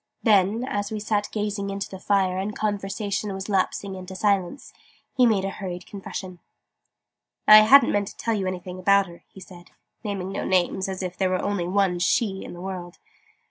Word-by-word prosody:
Then, 210 +1 +3
as 205 -4 -2
we 215 - -3
sat 210 -1 -1
gazing 205 -2 -2
into 195 0 -4
the 190 - -9
fire, 190 -1 +1
and 205 +2 -3
conversation 205 0 -2
was 190 0 -6
lapsing 195 0 0
into 185 0 -8
silence, 200 +5 -1 0.4
he 250 -2 +5
made 200 -4 +2
a 195 - -2
hurried 185 -2 -6
confession. 190 -2 -7 1.1
"I 215 - +11
hadn't 240 +6 +7
meant 205 -1 0
to - - -10
tell 230 - -1
you 195 -3 -1
anything 185 0 -5
about 200 +1 +4
her," 170 -2 -14
he - - -15
said 175 -2 -13 0.3
(naming 195 -3 -4
no - - -3
names, 185 +1 +1
as 190 0 -4
if 180 -1 -4
there 190 -1 +1
were 185 0 -1
only 200 -4 -1
one 185 -1 +1
'she' 195 +2 +1
in - - -8
the 175 - -9
world!) 180 -2 -6
195 Hz, 190 wpm, -24 LUFS, 185-205 Hz, 1.1 s, I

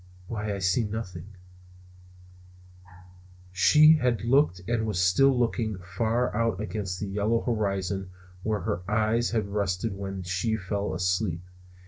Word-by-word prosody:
"Why, 105 -1 -3
I - - -4
see 95 +5 +1
nothing." 100 -5 -5 2.2
She 150 - +6
had 120 -6 0
looked 120 -6 +3
and 115 -2 0
was 105 -5 -1
still 125 +10 +4
looking 115 -3 0
far 110 +7 -1
out 115 -4 0
against 105 -3 -4
the - - -3
yellow 105 +4 0
horizon 100 -4 -2 0.3
where 105 0 -1
her 95 -2 -2
eyes 110 +2 +1
had 110 -3 -1
rested 100 0 -1
when 95 -1 -5
she 90 +6 -1
fell 100 0 -3
asleep. 90 -1 -1
105 Hz, 130 wpm, -27 LUFS, 95-115 Hz, 2.2 s, She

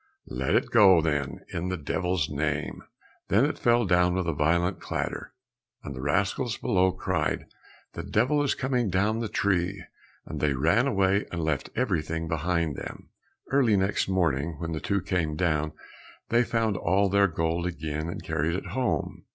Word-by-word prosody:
"Let 65 +1 0
it - - +1
go, 95 -4 +7
then, 75 -4 -2
in 90 +2 -2
the 95 - -2
devil's 90 +1 -1
name." 75 -1 -2 0.5
Then 105 +8 +4
it 150 - -2
fell 120 -1 +3
down 90 -1 +3
with 95 -2 -1
a 85 - +1
violent 85 +4 +1
clatter, - - -4 0.5
and 70 - -6
the 65 - -6
rascals 100 - 0
below 95 -1 +2
cried, 95 - -1 0.5
"The - - -5
devil 130 +7 +1
is 145 - +1
coming 125 -4 0
down 100 +5 +1
the 115 -2 -3
tree!" 95 -1 0 0.4
and - - -6
they 75 -2 +1
ran 85 - +2
away 100 -4 +2
and 85 -2 -3
left 80 -3 -1
everything 80 -8 -1
behind 80 -1 0
them. - - -8 0.4
Early 125 -7 +4
next 95 +1 +1
morning, 85 -4 0
when 85 +2 -4
the 80 - -2
two 100 +3 -1
came 85 -5 -1
down 80 -2 0 0.6
they 120 +1 +4
found 115 -4 0
all 95 +3 +2
their 100 +1 +4
gold 80 +1 -1
again, 80 -1 -4
and - - -6
carried 80 +4 -1
it 95 - -4
home. 125 +4 -2
90 Hz, 170 wpm, -27 LUFS, 80-100 Hz, 0.6 s, go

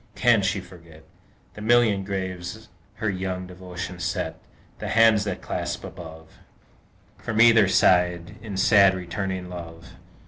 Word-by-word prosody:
Can 120 -4 +4
she 95 +1 0
forget 80 -3 -16 0.5
The 105 - -10
million 110 -3 +3
graves 95 +2 -5 0.3
her 110 - -3
young 95 -1 -4
devotion 90 0 -8
set, 90 0 -3 0.4
The - - -5
hands 110 -2 +4
that 100 -3 -4
clasp - - -4
above, 80 -1 -11 0.8
From 110 -1 -3
either 115 -3 +6
side, 90 -2 +2
in 105 -3 -6
sad, 100 -1 +5
returning 95 +1 -4
love? 85 -2 -10
95 Hz, 130 wpm, -24 LUFS, 90-105 Hz, 0.8 s, either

